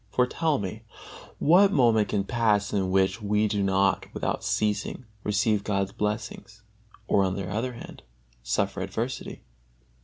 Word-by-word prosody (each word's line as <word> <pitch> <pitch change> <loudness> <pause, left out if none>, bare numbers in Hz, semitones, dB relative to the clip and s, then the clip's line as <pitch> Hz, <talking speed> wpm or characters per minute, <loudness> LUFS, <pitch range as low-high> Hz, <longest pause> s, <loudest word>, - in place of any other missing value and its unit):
For, 125 +4 +2
tell 155 +3 0
me, 100 +2 -5 0.6
what 190 +6 +5
moment 115 - +3
can 100 -2 0
pass 105 -2 +1
in 95 -2 0
which 95 +4 +1
we 105 +1 +1
do 105 -1 -1
not 95 0 +1
without - - -2
ceasing 105 +4 -1 0.2
receive 105 0 +1
God's 100 -2 -1
blessings, 105 +1 -4 0.4
or, 100 - +3
on 95 -1 0
the 100 -2 -4
other 115 +6 -2
hand, 115 - -11 0.4
suffer 95 +11 -1
adversity? 110 +7 -4
105 Hz, 145 wpm, -26 LUFS, 100-115 Hz, 0.6 s, what